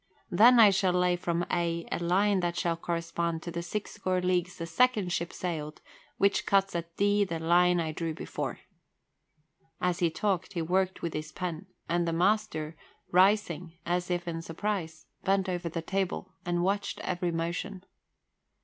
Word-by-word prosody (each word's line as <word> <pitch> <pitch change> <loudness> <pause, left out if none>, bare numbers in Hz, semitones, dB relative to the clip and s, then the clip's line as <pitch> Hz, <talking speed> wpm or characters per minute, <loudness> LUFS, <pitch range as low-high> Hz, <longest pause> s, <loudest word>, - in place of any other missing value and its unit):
Then 235 +7 +7
I 215 -3 +9
shall 190 -2 +2
lay 180 0 +3
from 175 0 -1
A 170 -1 0
a - - -1
line 190 +3 +2
that 175 -1 -1
shall 170 -1 +1
correspond 170 0 -2
to 170 - -5
the 170 - -3
six 200 +4 -4
score 185 -2 -1
leagues 180 0 0
the 165 - -4
second 205 0 +2
ship 170 0 -2
sailed, 155 -4 -4 0.4
which 200 0 +2
cuts 195 -2 +2
at 170 0 -5
D 205 +1 +3
the 170 -4 -3
line 175 +2 +4
I 160 -2 -1
drew 160 0 -3
before." - - -5 1.2
As 180 -1 0
he 170 - +3
talked, 190 +2 -1
he 170 - -1
worked 185 +2 0
with 170 - -2
his 155 0 -5
pen, 180 +1 -5 0.2
and 170 +1 +1
the 165 - 0
master, 170 -4 +1 0.4
rising 180 -3 +3
as 175 +1 -1
if 175 -1 -1
in 165 -1 -3
surprise, 165 -2 -4 0.2
bent 195 0 +2
over 175 -2 -2
the 165 0 -4
table 190 +1 -2
and 175 0 +1
watched 200 +2 -1
every 175 -1 -1
motion. 170 +3 -3
175 Hz, 170 wpm, -29 LUFS, 170-190 Hz, 1.2 s, I